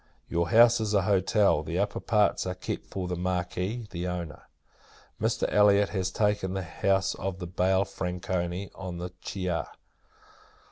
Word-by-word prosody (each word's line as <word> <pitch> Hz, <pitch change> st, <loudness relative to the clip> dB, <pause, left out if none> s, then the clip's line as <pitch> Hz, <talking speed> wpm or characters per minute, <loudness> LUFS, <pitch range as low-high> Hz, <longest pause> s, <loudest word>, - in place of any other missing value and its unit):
Your 85 Hz, 0 st, 0 dB
house 120 Hz, +1 st, +6 dB
is 105 Hz, -1 st, 0 dB
a 100 Hz, -, +3 dB
hotel; 100 Hz, -3 st, +3 dB
the 80 Hz, +3 st, -4 dB
upper 100 Hz, +2 st, 0 dB
parts 105 Hz, -4 st, +2 dB
are 90 Hz, -, -2 dB
kept 90 Hz, -, -5 dB
for 95 Hz, -2 st, -4 dB
the 90 Hz, -, -2 dB
Marquis, 90 Hz, +5 st, -2 dB
the 90 Hz, 0 st, -3 dB
owner. 85 Hz, -3 st, -5 dB, 0.7 s
Mr. -, -, +1 dB
Elliot 105 Hz, -1 st, +5 dB
has 95 Hz, -3 st, -1 dB
taken 105 Hz, -2 st, 0 dB
the 95 Hz, -, -2 dB
house 95 Hz, +2 st, +1 dB
of 95 Hz, 0 st, -4 dB
the 90 Hz, -, -6 dB
Baille 95 Hz, +2 st, +1 dB
Franconi, 90 Hz, 0 st, -3 dB
on 90 Hz, -2 st, -6 dB
the 90 Hz, +1 st, -5 dB
Chaia. 90 Hz, -4 st, -2 dB
95 Hz, 155 wpm, -28 LUFS, 90-100 Hz, 0.7 s, house